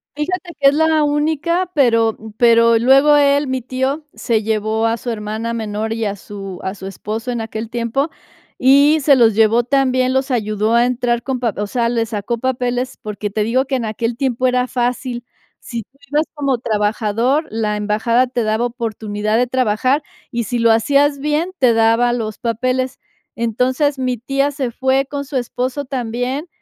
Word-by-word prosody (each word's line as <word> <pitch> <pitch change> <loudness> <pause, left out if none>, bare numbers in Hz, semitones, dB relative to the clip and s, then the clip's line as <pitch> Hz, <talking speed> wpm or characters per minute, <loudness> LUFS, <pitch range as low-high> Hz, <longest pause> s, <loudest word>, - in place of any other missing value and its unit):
Fíjate 350 +4 -3
que 275 -1 +6
es 285 - -1
la 315 0 +3
única, 315 +5 0
pero, 230 -6 +3
mm, 220 0 -11
pero 230 -1 +5
luego 270 +5 +5
él, 285 0 +3
mi 260 -1 -2
tío, 265 +4 -2
se 225 -3 -1
llevó 220 +1 0
a 225 +1 +1
su 245 - -6
hermana 220 +1 -3
menor 220 0 -3
y 225 -1 -2
a 200 - -2
su 195 -2 -8
a 190 +1 -4
su 190 - -10
esposo 215 +5 -5
en 235 -2 -3
aquel 220 0 -5
tiempo, 240 +6 -1 0.5
y 280 +4 +5
se 280 0 +5
los 230 -4 +4
llevó 225 +2 +3
también, 255 0 +1
los 265 +1 0
ayudó 215 -2 0
a 235 +1 +4
entrar 240 -1 0
con 265 -2 -2
pap 235 -5 -2
o 205 - -1
sea, 235 +2 0
le 230 -1 0
sacó 220 +1 -3
papeles, 250 0 -2
porque 210 -1 -5
te 215 - -1
digo, 255 +4 +1
que 270 - -2
en 240 -3 -2
aquel 230 +2 -2
tiempo 255 0 -1
era 250 0 +2
fácil. 245 0 -2 0.3
Si 235 -2 -6
tú 265 +6 -21
ibas 300 +2 +2
como 275 -4 0
trabajador, 220 +7 0
la 215 -1 -1
embajada 220 +4 +1
te 245 -2 -2
daba 220 +2 0
oportunidad 220 -3 -2
de 250 +1 +2
trabajar, 255 +3 +1 0.3
y 235 -2 -2
si 240 +3 -2
lo 230 -1 +4
hacías 280 +5 +3
bien, 300 +5 -1
te 250 -4 +4
daba 230 +2 +3
los 220 -3 -3
papeles. 255 +3 -1 0.4
Entonces, 255 +5 0
mi 255 -2 -1
tía 275 +4 0
se 270 -4 -3
fue 265 +3 0
con 285 -1 -4
su 275 -1 -3
esposo 255 +3 -3
también, 255 +4 -3
245 Hz, 185 wpm, -18 LUFS, 225-270 Hz, 0.5 s, que